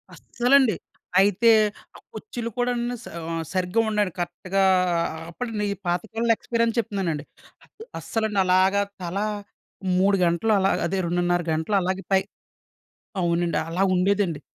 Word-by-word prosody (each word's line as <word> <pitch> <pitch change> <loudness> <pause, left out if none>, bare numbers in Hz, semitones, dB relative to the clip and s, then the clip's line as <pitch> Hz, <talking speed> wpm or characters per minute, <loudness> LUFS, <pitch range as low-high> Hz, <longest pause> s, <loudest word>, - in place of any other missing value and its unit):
అస్సలండి 245 -3 +3 0.4
అయితే 205 +4 +4 0.5
ఆ - - -10 0.2
కుర్చీలు 240 - -5
కూడండి 245 0 -1
సా - - -9 0.2
ఆహ్, 165 0 -2
సరిగ్గా 185 +3 0
అ - - -2
ఉండండి 210 -3 0
కరెక్ట్‌గా 185 +3 -1 0.7
అప్పుడు 240 +8 -5 0.4
పాత 175 0 +1
కాలంలో 230 +1 +2
ఎక్స్‌పిరియన్స్ 230 0 -1
చెప్తున్నానండి. 185 -9 -2 0.7
అస్సలండి 220 -3 -1
అలాగా 190 +2 +3 0.2
తల 175 +1 -4 0.8
3 195 +1 +3
గంటలు 170 +6 +1
అలా 195 0 +2 0.2
అదే 190 +2 -1
2:30 175 0 +1
గంటలు 160 +6 -1
అలాగే 185 +1 -2
పై 190 - +5 1.0
అవునండి. 170 0 +1
అలా 180 +4 0
ఉండేదండి. 185 -4 +1
195 Hz, 125 wpm, -24 LUFS, 175-225 Hz, 1.0 s, పై